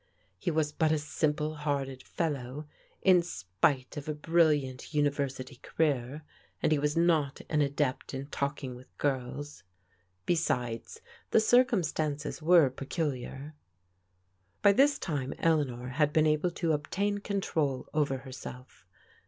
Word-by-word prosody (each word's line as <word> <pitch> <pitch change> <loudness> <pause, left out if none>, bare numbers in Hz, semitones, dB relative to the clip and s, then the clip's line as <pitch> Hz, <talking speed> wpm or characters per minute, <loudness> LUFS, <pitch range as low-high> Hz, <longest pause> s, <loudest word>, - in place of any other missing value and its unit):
He - - -1
was 155 -2 +1
but 155 +1 +1
a 160 - +3
simple 150 +1 -1
hearted 140 -3 -2
fellow, 145 -3 -3 0.4
m 185 -2 +7
spite 125 - -1
of 145 +1 -5
a 155 - -1
brilliant 150 -4 +1
university 140 -2 -1
career, 145 0 -1 0.4
and - - +1
he 155 - +3
was 150 +2 0
not 160 -5 +2
an 150 -1 +2
adept 140 -2 -1
in 135 +1 -4
talking 140 -2 -3
with 125 +1 -15
girls. 140 -2 -2 0.6
Besides, 125 -9 -1 0.3
the - - +5
circumstances 170 - +1
were 160 -4 +6
pe 135 +1 -8
culiar. 145 -2 -3 1.1
By 200 - +8
this 280 +6 +4
time 140 -6 -3
Eleanor 135 -7 +1
had 145 +3 +2
been 155 0 +3
able 155 +3 +2
to 170 -1 -1
obtain 200 +8 -1
control 160 -9 -1
over 145 -3 +1
herself. 130 -1 -10
150 Hz, 130 wpm, -30 LUFS, 135-160 Hz, 1.1 s, By